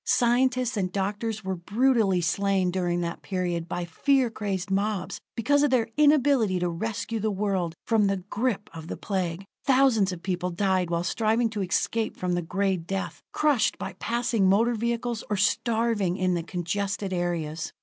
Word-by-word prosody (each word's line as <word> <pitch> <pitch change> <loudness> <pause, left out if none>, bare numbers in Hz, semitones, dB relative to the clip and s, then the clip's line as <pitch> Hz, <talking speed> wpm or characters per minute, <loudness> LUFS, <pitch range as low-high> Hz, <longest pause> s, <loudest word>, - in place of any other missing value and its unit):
Scientists 255 0 +2
and 185 -2 -1
doctors 205 +3 -2
were 190 0 -2
brutally 205 +1 +2
slain 190 +2 +1
during 175 -1 0
that 170 -1 -4
period 175 -3 -2
by 175 0 -2
fear 255 - +2
crazed 195 -3 -3
mobs, 200 0 -1 0.2
because 285 +5 +2
of 290 - +3
their 235 -3 +2
inability 285 -9 +4
to 180 0 0
rescue 220 +5 -3
the 215 +1 0
world 190 -4 -1
from 220 -3 +3
the 195 0 +1
grip 210 +3 -2
of 160 -1 -8
the - - -5
Plague. 185 -2 -3 0.2
Thousands 255 -7 +4
of 175 -2 -7
people 180 -1 -1
died 185 -1 0
while 170 0 0
striving 225 +5 +1
to 210 -2 -3
escape 220 +4 -1
from 180 -1 -1
the 175 - 0
Gray 190 +3 0
Death, 195 +3 -4
crushed 290 -7 +2
by 190 - -5
passing 230 -4 +1
motor 225 +5 +3
vehicles, 235 0 -2
or 210 - 0
starving 210 -2 +1
in 185 -1 +1
the 170 - 0
congested 190 +3 -3
areas. 165 -3 -2
200 Hz, 170 wpm, -26 LUFS, 180-230 Hz, 0.2 s, inability